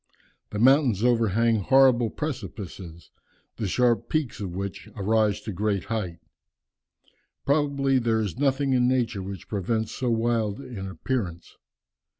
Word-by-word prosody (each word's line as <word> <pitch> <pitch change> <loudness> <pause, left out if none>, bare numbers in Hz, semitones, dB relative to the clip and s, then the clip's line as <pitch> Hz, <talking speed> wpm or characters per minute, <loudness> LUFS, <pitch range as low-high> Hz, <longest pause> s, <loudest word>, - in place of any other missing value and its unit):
The 105 - -5
mountains 125 -3 +4
overhang 115 -1 +3
horrible 125 +2 +4
precipices, 95 - -7 0.5
the 110 - -2
sharp 120 +2 +1
peaks 155 -7 -1
of 95 -4 -5
which 100 0 -5
arise 105 0 +1
to 110 - -5
great 100 0 -1
height. 105 -7 -3 1.3
Probably 140 -2 +2
there 115 -2 +1
is 105 -5 -3
nothing 135 -1 +1
in 125 -1 +3
nature 120 -5 0
which 95 0 -7
presents 110 +2 -2
so 125 - -2
wild 115 -2 0
an 120 -8 -7
appearance. 95 -2 -4
115 Hz, 130 wpm, -26 LUFS, 100-130 Hz, 1.3 s, mountains